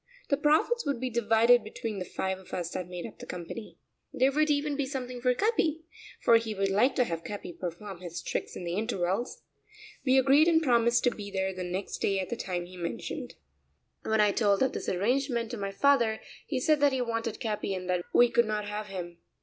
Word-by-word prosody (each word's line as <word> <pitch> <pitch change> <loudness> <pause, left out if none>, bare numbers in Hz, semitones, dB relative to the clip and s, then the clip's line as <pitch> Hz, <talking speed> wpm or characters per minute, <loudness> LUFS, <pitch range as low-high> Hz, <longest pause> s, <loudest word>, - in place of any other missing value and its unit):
The 280 - +3
profits 310 - +2
would 280 -5 -1
be 255 0 -2
divided 230 +1 +4
between 215 -1 -5
the 180 - -4
five 190 +1 -3
of 190 - -8
us 175 -1 -3
that 185 -2 -4
made 180 -1 -6
up - - -10
the - - -9
company. 180 +5 -7 0.3
There 260 +2 +3
would 305 +2 +2
even 290 0 +1
be 280 -1 -1
something 255 -2 -5
for 250 0 +3
Capi, 325 - +1 0.4
for 230 - +7
he 225 -2 -3
would 195 0 0
like 225 +8 +3
to 255 - +4
have 165 -7 -4
Capi 205 -4 -6
perform 180 +2 -6
his 175 -2 -7
tricks - - -3
in - - -6
the 170 0 -3
intervals. 200 +1 -2 0.6
We 265 -1 +4
agreed 275 +4 +5
and 330 -2 +5
promised 235 -3 +3
to 245 - +4
be 205 -3 -7
there 190 -1 -1
the 185 0 -5
next 180 +2 -4
day 195 -1 +1
at 185 - -3
the - - -2
time 180 -5 -3
he 180 +1 -12
mentioned. 170 -1 -5 0.7
When 220 0 0
I 210 -1 +5
told 200 +1 +2
of 265 - +1
this - - -3
arrangement 235 +4 0
to 240 - -4
my 200 -1 -3
father 235 -1 +3 0.3
he 265 - -1
said 305 +3 +3
that 285 -1 +4
he 260 - 0
wanted 230 -2 -2
Capi 210 -3 -2
and 185 -1 -6
that 180 -1 0
we 245 - +6
could 235 0 +4
not 210 -1 -2
have 210 0 -4
him. 175 -3 -7
220 Hz, 220 wpm, -29 LUFS, 190-260 Hz, 0.7 s, for